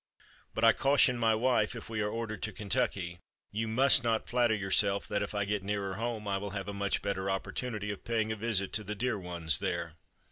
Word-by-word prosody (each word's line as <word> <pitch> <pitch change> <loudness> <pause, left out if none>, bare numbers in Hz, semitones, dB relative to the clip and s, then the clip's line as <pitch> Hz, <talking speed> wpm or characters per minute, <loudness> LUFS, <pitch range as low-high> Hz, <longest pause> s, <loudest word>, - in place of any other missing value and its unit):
But 110 - -2
I 115 - +7
caution 135 -2 +4
my 115 -1 +3
wife 115 -1 +1
if 115 - -8
we 110 -2 -3
are 105 - 0
ordered 115 -1 -4
to 110 - -3
Kentucky: 100 -5 -1 0.3
"You 110 +2 -2
must 130 +3 +4
not 115 -2 0
flatter 120 -2 +2
yourself 100 0 +2
that, 100 0 -1
if 105 - -4
I 100 -1 0
get 105 0 -1
nearer 100 -1 -2
home, 110 0 -3
I 100 -1 0
will 100 +1 -5
have 100 - -5
a 100 - -4
much 100 0 -1
better 95 -1 -2
opportunity 105 +2 -3
of 100 - -8
paying 110 -2 0
a - - -1
visit 105 -3 0
to 110 - +1
the 105 +1 -5
dear 120 0 -1
ones 85 -5 +2
there." - - -2
105 Hz, 220 wpm, -31 LUFS, 100-115 Hz, 0.3 s, I